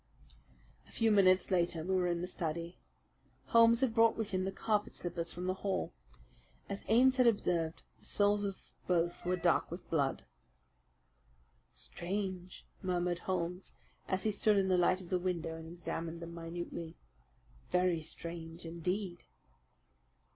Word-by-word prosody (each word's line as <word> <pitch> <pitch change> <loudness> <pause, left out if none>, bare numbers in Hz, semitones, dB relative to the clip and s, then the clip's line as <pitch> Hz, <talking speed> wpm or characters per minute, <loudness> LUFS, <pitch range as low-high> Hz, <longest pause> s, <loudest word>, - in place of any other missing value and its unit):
A - - -18
few 225 -1 +2
minutes 190 -2 +5
later 170 -3 +1
we 190 +3 -1
were 180 -1 +2
in 170 -1 0
the 180 - -3
study. 170 -1 -4 0.7
Holmes 230 0 +6
had 260 -4 +2
brought 230 0 +4
with 220 -2 -3
him 185 -1 0
the 195 - -1
carpet 210 +1 -1
slippers 170 -1 -4
from 180 +1 -5
the 185 - +1
hall. 195 0 -2 0.7
As 200 0 -5
Ames 255 +4 +5
had 250 -2 +5
observed, 170 -7 +1 0.2
the - - -16
soles 205 0 +3
of 195 -1 -6
both 175 -1 +1
were 180 +1 +1
dark 175 -2 +2
with 170 +2 -8
blood. 140 -5 0 1.5
"Strange!" 185 0 -5 0.2
murmured 175 -1 0
Holmes, 180 0 -3 0.3
as 190 0 0
he 215 - +2
stood 210 0 +3
in 190 -1 +2
the 185 - +4
light 185 +2 +3
of 175 - -11
the 185 - +2
window 170 -3 -2
and 160 0 -8
examined 170 -1 -4
them 170 0 -7
minutely. 170 -1 -6 0.7
"Very 180 -2 +2
strange 165 +1 -6
indeed!" 175 +2 -3
180 Hz, 150 wpm, -34 LUFS, 170-195 Hz, 1.5 s, Holmes